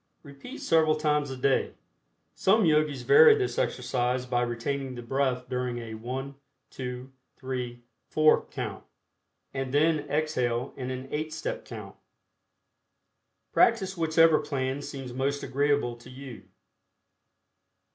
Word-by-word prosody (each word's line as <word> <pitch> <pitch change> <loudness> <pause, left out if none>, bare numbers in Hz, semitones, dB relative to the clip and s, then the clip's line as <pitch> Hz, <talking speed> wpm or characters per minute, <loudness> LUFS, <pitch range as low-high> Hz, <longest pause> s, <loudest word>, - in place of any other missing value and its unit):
Repeat 140 - -10
several 160 -1 +3
times 150 -2 +1
a 130 - -5
day. 135 +1 +1 0.6
Some 210 +1 +3
Yogis 150 -3 +2
vary 450 +1 +8
this 415 +3 -1
exercise 125 - -1
by 125 -1 0
retaining 130 +3 -3
the 120 - -7
breath 125 0 -1
during 125 -1 -2
a 115 -2 -6
1, 130 +5 -5 0.4
2, 125 0 -6 0.3
3, 125 -2 -5 0.3
4, 155 0 +4
count, - - -5 0.7
and 135 -1 -3
then 155 +2 +3
exhale 130 -5 -1
in 130 -2 -5
an 130 0 -5
eight 155 +1 -2
step - - -4
count. - - -9 1.6
Practice 195 -5 +3
whichever 165 -1 +4
plan 135 0 -2
seems 135 -3 -7
most 140 +2 -1
agreeable 140 -3 +1
to 120 - -14
you. 130 -4 -10
135 Hz, 125 wpm, -28 LUFS, 125-155 Hz, 1.6 s, vary